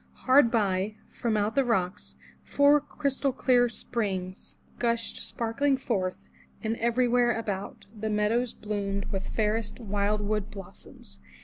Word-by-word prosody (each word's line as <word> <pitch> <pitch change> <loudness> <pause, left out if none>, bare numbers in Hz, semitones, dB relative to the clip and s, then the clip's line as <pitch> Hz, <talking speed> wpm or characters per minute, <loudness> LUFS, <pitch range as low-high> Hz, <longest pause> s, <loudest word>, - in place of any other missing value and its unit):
Hard 260 -1 +6
by, 205 -2 0
from 225 -3 -1
out 210 +1 0
the 275 - +3
rocks, 190 -7 -1 0.3
four 285 +1 +4
clear 290 - -28
crystal 265 -3 +2
springs 190 -5 -4 0.2
gushed 235 -1 -1
sparkling 270 +4 0
forth, 190 -8 -2 0.4
and 220 +1 0
every 235 +2 +2
where 240 -1 +3
about, 205 -3 -4
the 220 +1 -3
meadows 215 +3 +1
bloomed 200 -2 -3
with 195 0 -3
fairest 220 +1 -1
wildwood 210 -1 -1
blos 195 -3 -11
soms. 65 0 -12
220 Hz, 130 wpm, -28 LUFS, 200-245 Hz, 0.4 s, Hard